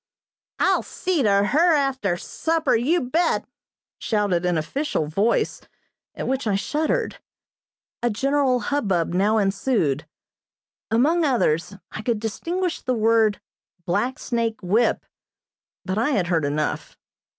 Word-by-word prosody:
"I'll - - +2
see 360 -5 -2
to 200 -4 +3
her 320 +9 +4
after 265 -10 0
supper, 325 - 0
you 295 +10 +2
bet!" 325 +7 0 0.5
shouted 200 -5 0
an 175 -2 +1
official 165 - -2
voice, 200 +10 0 0.5
at - - -4
which 265 -2 -1
I 200 - +2
shuddered. 315 - -1 0.8
A 240 - +1
general 265 +2 +1
hubbub 195 - 0
now 205 +4 +2
ensued; 195 - 0 0.8
among 295 +10 +3
others 200 - +1 0.2
I - - -6
could 225 -1 -1
distinguish 335 - -3
the 255 - -1
word 220 -1 +3 0.5
"black 210 +9 0
snake 230 -2 -2
whip," 215 +7 +1 0.8
but 190 +3 -1
I 240 - +1
had 205 -11 +1
heard 165 -4 +1
enough. 150 +1 -2
225 Hz, 125 wpm, -23 LUFS, 195-280 Hz, 0.8 s, her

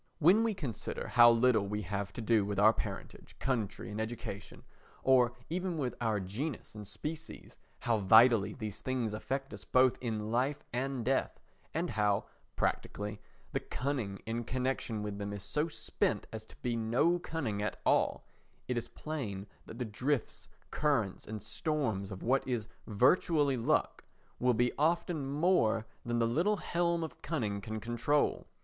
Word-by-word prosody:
When 185 +8 +5
we 225 -2 +1
consider 140 - -4
how 120 -1 +8
little 115 -3 +4
we 105 +1 -2
have 100 +1 -3
to - - -5
do 110 -1 +3
with 100 0 -3
our 105 +2 +7
parentage, - - -6
country 115 -4 -2
and 105 +1 -3
education, 110 -3 -6 0.4
or 125 -2 +5
even 180 0 -2
with 130 -5 -1
our 110 -3 +1
genus 110 +10 -4
and 105 -2 -8
species, 150 +10 -7 0.3
how 115 -2 +2
vitally 110 +1 +6
these 110 -5 -5
things 125 -5 -1
affect 135 +5 -3
us - - -7
both 130 0 +4
in 110 -3 -2
life 130 +5 0
and 130 -1 -1
death, 135 +1 0 0.3
and 170 +2 -1
how, 105 -2 +1 0.3
practically, 105 0 -2 0.3
the - - 0
cunning 125 -8 -3
in 115 +1 -2
connection 125 -3 -2
with 105 -1 -4
them 100 0 -3
is 100 -1 -6
so 150 +9 0
spent 160 - -1
as 110 0 -6
to - - -15
be 120 -1 0
no 120 +10 +2
cunning 135 -12 -3
at 105 - -2
all, - - +2 0.4
it 125 -1 0
is 120 - -7
plain 115 -13 -5 0.2
that 115 - -9
the 125 - -2
drifts, 125 +5 -2 0.2
currents, 130 -11 0
and 110 -1 -6
storms 110 - -1
of 95 -2 -7
what 130 +3 +2
is 120 -4 -1 0.2
virtually 140 - +3
luck 130 +6 +1 0.4
will 125 -1 +3
be 120 +2 +2
often 160 -2 +1
more 140 - +2 0.2
than 120 0 -1
the 115 - +3
little 170 - +2
helm 170 -2 0
of 160 - -7
cunning 105 -11 -2
can 110 +2 -4
control. 120 +6 0
120 Hz, 165 wpm, -32 LUFS, 105-140 Hz, 0.4 s, how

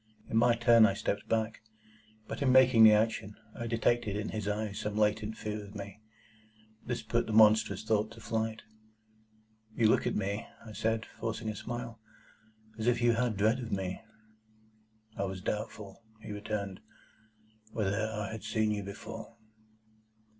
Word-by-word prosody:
In - - -1
my 120 +1 +5
turn, 115 -1 +6
I 100 - -1
stepped 100 - -3
back. 110 0 0 0.7
But - - -6
in 135 -2 +3
making 130 -3 +7
the 110 - +10
action, 105 -1 +1 0.2
I 120 -2 -5
detected 115 -2 +1
in 105 +1 -3
his 105 -2 -4
eyes 105 -1 -2
some 105 0 -3
latent 110 +1 +1
fear 105 -1 -4
of 100 +1 -12
me. 100 +1 -8 0.8
This 120 -1 -3
put 115 +2 0
the 110 - -3
monstrous 110 -2 +5
thought 110 -1 +1
to - - -13
flight. 110 0 -2 1.1
"You 115 - +4
look - - +3
at - - -1
me," 100 +3 -2 0.2
I 110 - -9
said, 110 +1 -1
forcing 115 0 -4
a 110 - -4
smile, 120 +1 -6 0.8
"as 110 - -2
if 120 -1 +3
you 120 0 +4
had 115 0 +1
a - - -8
dread 110 +5 +2
of 120 -2 -6
me." 95 -1 -3 1.2
"I 100 - 0
was 95 -1 -5
doubtful," 105 -1 -5 0.2
he 110 - -9
returned, 105 -2 -4 0.9
"whether 110 0 -1
I 105 -1 -4
had 110 - -7
seen 110 -1 0
you 105 -1 -1
before." 110 +3 -8
110 Hz, 165 wpm, -31 LUFS, 105-115 Hz, 1.2 s, the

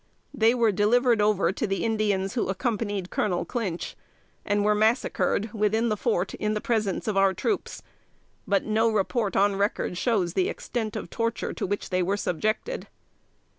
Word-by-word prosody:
They 225 +2 +3
were 230 -3 +3
delivered 225 +3 +3
over 205 -3 +3
to 215 - -2
the 195 +2 -1
Indians 205 -3 0
who 240 - -1
accompanied 205 -2 -2
Colonel 180 -4 0
Clinch, 200 -9 -3 0.5
and 205 0 +1
were 210 - +4
massacred 215 -1 +1
within 220 +2 +1
the 215 - +1
fort, 190 -2 -1
in 215 0 -1
the - - 0
presence 215 -4 -1
of 210 -2 0
our 195 -1 +4
troops; 415 - -2 0.6
but 200 -1 +2
no 220 +1 +2
report 215 +1 0
on 200 0 +3
record 200 -3 -1
shows 190 -7 +1
the 185 - +1
extent 220 -3 -4
of - - -5
torture 230 0 -2
to - - -3
which 205 +1 -3
they 185 0 +2
were 195 +3 0
subjected. 215 - -2
210 Hz, 170 wpm, -26 LUFS, 195-225 Hz, 0.6 s, were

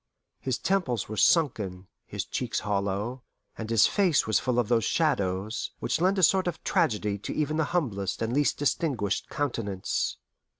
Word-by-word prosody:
His 130 -2 -1
temples 155 - 0
were 110 - -5
sunken, 105 - +2 0.2
his - - -4
cheeks - - -2
hollow, 100 +5 -2 0.3
and 110 -1 -6
his 115 -3 +5
face 185 -7 +3
was 110 - +2
full 125 -2 -1
of 120 -3 +2
those 115 -1 +2
shadows 105 - 0
which - - -1
lend 190 +2 +3
a 190 - +1
sort 190 +2 +4
of 175 - -4
tragedy 105 - +1
to - - -5
even 155 0 0
the 160 - +2
humblest 115 - -1
and 115 +1 -1
least 145 +1 +2
distinguished 130 - -1
countenance. 115 - -2
120 Hz, 165 wpm, -27 LUFS, 105-155 Hz, 0.3 s, his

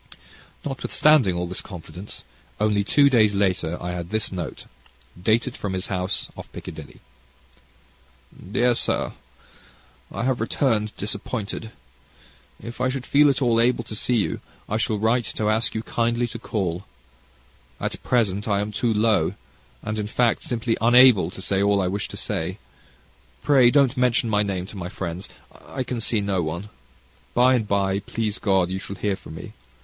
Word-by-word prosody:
Notwithstanding 135 - +3
all 90 0 -1
this 90 +1 -4
confidence, 90 +1 -9 0.4
only 105 -1 +2
two 140 +7 +5
days 110 -6 +4
later 90 -4 0
I 90 - -4
had 85 -1 -5
this 110 +1 0
note, 90 -4 -5 0.6
dated 115 +6 +1
from 100 -2 -4
his 95 +1 -3
house 95 +1 -1
off - - -10
Piccadilly: - - -9 1.5
Dear 120 +3 +3
Sir, - - 0 1.0
I - - -3
have 130 -2 0
returned 110 -3 0
disappointed. 105 +2 -4 0.9
If 120 +2 -8
I 130 - +2
should 130 -1 -3
feel 145 +1 +5
at 135 0 +1
all 115 -2 +3
able 120 0 +2
to 110 -1 -7
see 125 +3 +1
you, 105 - 0 0.3
I 110 - -1
shall 110 0 0
write 115 +3 +2
to 110 0 +1
ask 110 +1 +1
you 110 - -2
kindly 120 +1 0
to - - -7
call. 95 -4 -2 1.0
At - - -3
present, 105 -5 +1
I 100 -2 +2
am 105 +1 -2
too 115 +3 0
low, 110 0 +2 0.5
and, 110 0 -3
in 105 - -2
fact, 120 +2 +1
simply 115 -1 -1
unable 120 -6 +6
to 95 +1 -7
say 95 -1 +1
all 100 0 +3
I 95 - +1
wish 100 +2 -2
to - - -9
say. - - -3 0.9
Pray 130 -4 +6
don't 140 -1 +4
mention 125 -2 +2
my 105 -1 +3
name 95 -3 -2
to 100 - -11
my 90 -1 -5
friends. 90 -1 -5 0.3
I 130 - -4
can 120 -2 -4
see 110 -1 +2
no 100 -2 0
one. 85 +6 -4 0.7
By 125 +2 +5
and 115 -4 +1
by, 100 -1 +1
please 110 0 -3
God, 95 -3 +2
you 95 - -2
shall 100 - -6
hear 100 +1 -1
from 80 - -11
me. - - -9
105 Hz, 170 wpm, -24 LUFS, 95-120 Hz, 1.5 s, unable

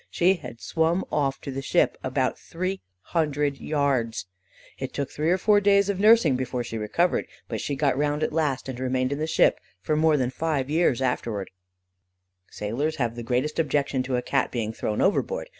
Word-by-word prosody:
She 180 +2 +3
had 125 -10 -9
swum 165 +3 0
off 135 -2 0
to 140 - -5
the 135 +1 -4
ship, - - +2
about - - 0
three 185 +3 -4 0.2
hundred 145 - -1
yards. 135 -8 0 0.5
It - - -5
took 140 -2 -2
three 155 +2 -1
or 180 - +4
four 205 +2 +4
days 200 0 +4
of 195 -2 -1
nursing 210 - +6
before 125 -1 -2
she 115 - -6
recovered, 170 +12 +1 0.2
but - - -4
she 145 - -2
got 140 -2 +1
round 145 +2 0
at - - -1
last, 150 -5 0
and 130 -2 -5
remained 130 0 0
in 140 - -2
the 155 - -1
ship - - +3 0.2
for 155 +11 -1
more 155 0 +4
than 125 -2 0
five 145 -2 -1
years 155 -6 +2
afterwards. 115 -5 -2 1.0
"Sailors 130 +10 -2
have 120 -3 -1
the 120 - -5
greatest 125 +7 -1
objection 145 -4 +1
to 130 0 -2
a 125 - -1
Cat - - +1
being 110 -3 -3
thrown 105 -1 -2
overboard. - - 0
145 Hz, 190 wpm, -25 LUFS, 130-165 Hz, 1.0 s, nursing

